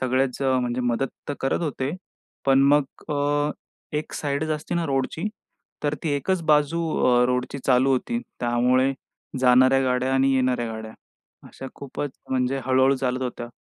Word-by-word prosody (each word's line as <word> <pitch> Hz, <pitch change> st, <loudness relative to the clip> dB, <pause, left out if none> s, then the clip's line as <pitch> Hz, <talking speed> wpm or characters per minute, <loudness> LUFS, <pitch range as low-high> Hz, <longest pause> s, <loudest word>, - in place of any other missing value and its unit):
सगळेच 130 Hz, 0 st, 0 dB
म्हणजे 125 Hz, -2 st, +1 dB
मदत 120 Hz, +2 st, 0 dB, 0.2 s
तर 145 Hz, -, -1 dB
करत 135 Hz, -, 0 dB
होते. 135 Hz, -3 st, -2 dB, 0.6 s
पण 135 Hz, 0 st, +5 dB
मग 145 Hz, -1 st, +4 dB, 0.3 s
अ, 145 Hz, +1 st, +1 dB, 0.5 s
एक 150 Hz, -, -4 dB
साइडच 145 Hz, +1 st, -2 dB
असते 155 Hz, +2 st, -3 dB
ना 170 Hz, -1 st, 0 dB
रोडची, 135 Hz, +3 st, -1 dB, 0.6 s
तर 145 Hz, 0 st, 0 dB
ती 165 Hz, -, -1 dB
एकच 170 Hz, +5 st, -1 dB
बाजू 150 Hz, +2 st, +3 dB, 0.2 s
अ, 125 Hz, -1 st, +5 dB
रोडची 125 Hz, +2 st, -1 dB
चालू 130 Hz, +1 st, +4 dB
होती. 235 Hz, -, -1 dB, 0.2 s
त्यामुळे 125 Hz, +2 st, +2 dB, 0.5 s
जाणाऱ्या 130 Hz, +1 st, +5 dB
गाड्या 125 Hz, +1 st, +1 dB
आणि 135 Hz, 0 st, +3 dB
येणाऱ्या 125 Hz, -2 st, +1 dB
गाड्या 110 Hz, 0 st, -7 dB, 0.6 s
अशा 135 Hz, -, -9 dB
खूपच 140 Hz, +1 st, -5 dB, 0.2 s
म्हणजे 130 Hz, +1 st, 0 dB
हळू-हळू 130 Hz, +1 st, +4 dB
चालत 130 Hz, 0 st, -1 dB
होत्या. 120 Hz, -1 st, -4 dB
130 Hz, 150 wpm, -24 LUFS, 125-145 Hz, 0.6 s, पण